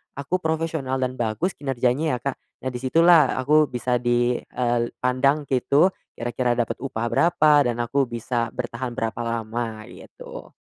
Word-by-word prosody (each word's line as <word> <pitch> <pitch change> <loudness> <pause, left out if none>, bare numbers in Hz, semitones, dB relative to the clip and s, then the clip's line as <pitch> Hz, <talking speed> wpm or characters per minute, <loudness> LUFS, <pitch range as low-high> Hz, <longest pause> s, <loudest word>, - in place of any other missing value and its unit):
aku 140 +7 -2
profesional 160 -5 -2
dan 130 -1 -2
bagus 120 - -1
kinerjanya 135 +2 0
ya, - - -3
Kak. 140 -1 -3 0.2
Nah, 130 - -2
di 125 - -5
situlah 160 +2 +4
aku 150 +3 +3
bisa 125 0 -1
di, 120 0 +1
eee, 120 -1 -1 0.2
pandang 140 +4 +2
gitu, 140 +8 +3 0.2
kira-kira 120 +1 -1
dapat 120 -1 -2
upah 120 -3 -3
berapa 165 -3 +3 0.2
dan 120 - -1
aku 135 +2 0
bisa 120 0 -2
bertahan 120 0 -4
berapa 115 -3 -3
lama 115 -1 -3
gitu. - - -11
125 Hz, 155 wpm, -23 LUFS, 120-140 Hz, 0.2 s, situlah